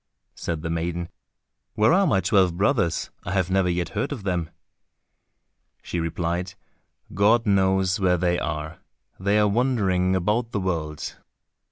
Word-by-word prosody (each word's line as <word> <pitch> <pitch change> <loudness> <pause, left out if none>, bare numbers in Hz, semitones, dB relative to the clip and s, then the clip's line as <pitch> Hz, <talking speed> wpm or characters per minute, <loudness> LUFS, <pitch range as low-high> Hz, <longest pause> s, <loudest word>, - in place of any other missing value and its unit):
Said 80 -2 -4
the 80 - -2
maiden, 85 +1 -3 0.7
"Where 110 +9 +4
are 195 +1 +4
my 95 -10 +2
twelve 95 -2 +2
brothers, 100 - +1
I 90 - -4
have 95 -2 0
never 95 -1 +2
yet 85 0 -1
heard 110 +8 -2
of 125 -8 -5
them?" 90 -4 -1 1.3
She 85 - -3
replied, 85 +3 -2 0.6
"God 110 +5 +3
knows 95 -1 +2
where 90 -2 +3
they 90 0 +1
are, 75 0 -4 0.4
they 100 +2 +2
are 105 0 +4
wandering 100 -6 +1
about 105 +6 0
the 100 - 0
world." 80 -5 -3
95 Hz, 145 wpm, -24 LUFS, 85-100 Hz, 1.3 s, Where